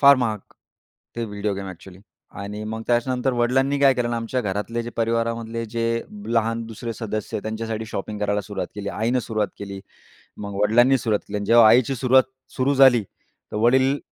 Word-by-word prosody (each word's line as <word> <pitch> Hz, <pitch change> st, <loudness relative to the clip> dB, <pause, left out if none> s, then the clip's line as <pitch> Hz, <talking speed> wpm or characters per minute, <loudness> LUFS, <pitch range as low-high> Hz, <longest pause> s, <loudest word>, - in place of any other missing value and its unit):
फार 140 Hz, -1 st, +8 dB
महाग 110 Hz, -4 st, -1 dB, 0.8 s
ते 115 Hz, -, -2 dB
व्हिडिओ 105 Hz, -1 st, -3 dB
गेम 95 Hz, 0 st, -6 dB
ॲक्च्युअली. 95 Hz, +1 st, -12 dB, 0.4 s
आणि 105 Hz, +1 st, -6 dB
मग 110 Hz, +1 st, -5 dB
त्याच्यानंतर 125 Hz, +2 st, +1 dB
वडिलांनी 135 Hz, +4 st, +1 dB
काय 135 Hz, -1 st, +6 dB
केलं 120 Hz, -2 st, -1 dB
ना 120 Hz, -, -1 dB
आमच्या 115 Hz, +2 st, -2 dB
घरातले 105 Hz, +2 st, -3 dB
जे 120 Hz, -, -6 dB
परिवारामधले 115 Hz, 0 st, -1 dB
जे 115 Hz, +1 st, -3 dB, 0.5 s
लहान 115 Hz, 0 st, +1 dB
दुसरे 115 Hz, +1 st, -6 dB
सदस्य 110 Hz, -2 st, -4 dB
त्यांच्यासाठी 110 Hz, +1 st, -4 dB
शॉपिंग 105 Hz, 0 st, -5 dB
करायला 105 Hz, 0 st, 0 dB
सुरुवात 100 Hz, 0 st, -5 dB
केली. 100 Hz, -1 st, -5 dB
आईनं 115 Hz, +5 st, 0 dB
सुरुवात 110 Hz, -3 st, -1 dB
केली, 100 Hz, -1 st, -7 dB, 0.6 s
मग 100 Hz, -1 st, -6 dB
वडिलांनी 120 Hz, +5 st, +4 dB
सुरुवात 110 Hz, -5 st, 0 dB
केली -, -, -3 dB
आणि 100 Hz, -, -4 dB
जेव्हा 115 Hz, 0 st, +7 dB
आईची 125 Hz, +4 st, +4 dB
सुरुवात 130 Hz, +1 st, +5 dB, 0.3 s
सुरू 135 Hz, +2 st, +2 dB
झाली. 130 Hz, -4 st, +6 dB, 0.5 s
तर -, -, -3 dB
वडील 130 Hz, +5 st, +3 dB
115 Hz, 175 wpm, -23 LUFS, 105-125 Hz, 0.8 s, फार